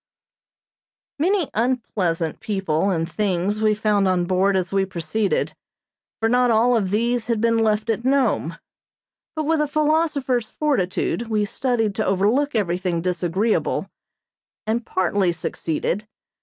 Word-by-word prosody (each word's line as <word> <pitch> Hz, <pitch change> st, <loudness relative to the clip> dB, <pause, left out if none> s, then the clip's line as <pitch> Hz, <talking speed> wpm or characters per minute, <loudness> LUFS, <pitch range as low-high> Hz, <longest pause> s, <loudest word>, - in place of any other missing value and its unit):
Many 360 Hz, 0 st, +1 dB
unpleasant 200 Hz, -9 st, -1 dB
people 195 Hz, -5 st, -1 dB
and 165 Hz, -3 st, 0 dB
things 200 Hz, +2 st, -1 dB
we 215 Hz, -1 st, +3 dB
found 210 Hz, -2 st, +1 dB
on 180 Hz, -1 st, +1 dB
board 190 Hz, +2 st, +2 dB
as 185 Hz, +1 st, -2 dB
we 195 Hz, 0 st, +3 dB
proceeded, 195 Hz, +3 st, -1 dB, 0.7 s
for 225 Hz, -, +1 dB
not 245 Hz, +1 st, +3 dB
all 235 Hz, +2 st, +4 dB
of 200 Hz, -5 st, 0 dB
these 235 Hz, +3 st, 0 dB
had 230 Hz, -2 st, 0 dB
been 230 Hz, 0 st, +2 dB
left 215 Hz, -1 st, +1 dB
at 225 Hz, +1 st, -3 dB
Nome; 250 Hz, -, +1 dB, 0.8 s
but 310 Hz, -, -1 dB
with 315 Hz, 0 st, +1 dB
a 300 Hz, -, +1 dB
philosopher's 295 Hz, -5 st, +1 dB
fortitude 235 Hz, -5 st, -1 dB
we 215 Hz, -2 st, +1 dB
studied 225 Hz, -1 st, -1 dB
to 215 Hz, -, -1 dB
overlook 215 Hz, +10 st, +1 dB
everything 180 Hz, -4 st, 0 dB
disagreeable, 180 Hz, +4 st, 0 dB, 0.7 s
and 230 Hz, +2 st, -1 dB
partly 185 Hz, 0 st, +1 dB
succeeded. 170 Hz, +4 st, -3 dB
215 Hz, 130 wpm, -22 LUFS, 185-240 Hz, 0.8 s, all